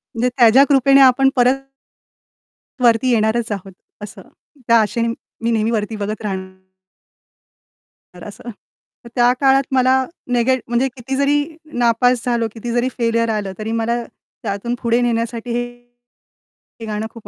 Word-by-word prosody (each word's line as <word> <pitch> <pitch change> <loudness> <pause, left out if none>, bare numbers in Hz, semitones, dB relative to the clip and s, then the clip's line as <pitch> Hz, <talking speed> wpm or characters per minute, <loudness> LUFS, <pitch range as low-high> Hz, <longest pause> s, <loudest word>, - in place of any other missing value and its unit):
म्हणजे 240 +2 +1
त्याच्या 245 +2 +6
कृपेने 275 0 +5
आपण 270 +1 +5
परत 250 +1 +4 1.3
वरती 235 +1 +3
येणारच 225 0 +1
आहोत, 195 -1 -5 0.3
असं. 210 - -9 0.5
त्या 230 0 +5
आशेने 230 +2 -1 0.3
मी 230 - +1
नेहमी 225 0 0
वरती 215 0 -2
बघत 210 +1 -4
राहणार. 190 -2 -6 1.5
तर 180 - -12
असं. 210 +3 -10 0.6
तर 235 - -10
त्या 245 0 +4
काळात 270 0 +4
मला 260 0 +3 0.4
नेगे 245 +2 +2
म्हणजे 240 +3 +1
किती 260 +2 -5
जरी 280 +1 +2 0.4
नापास 240 +1 +2
झालो, 235 -2 0
किती 235 +1 -6
जरी 240 +2 0
फेलीयर 230 -1 0
आलं, 210 -3 -2
तरी 215 +1 -4
मला 235 +1 -1 0.4
त्यातून 210 +3 -3
पुढे 235 0 +1
नेण्यासाठी 235 0 -2
हे 240 0 0 1.2
हे - - -5
गाणं 215 0 -4
खूप 225 -3 -13
235 Hz, 140 wpm, -18 LUFS, 220-245 Hz, 1.5 s, त्याच्या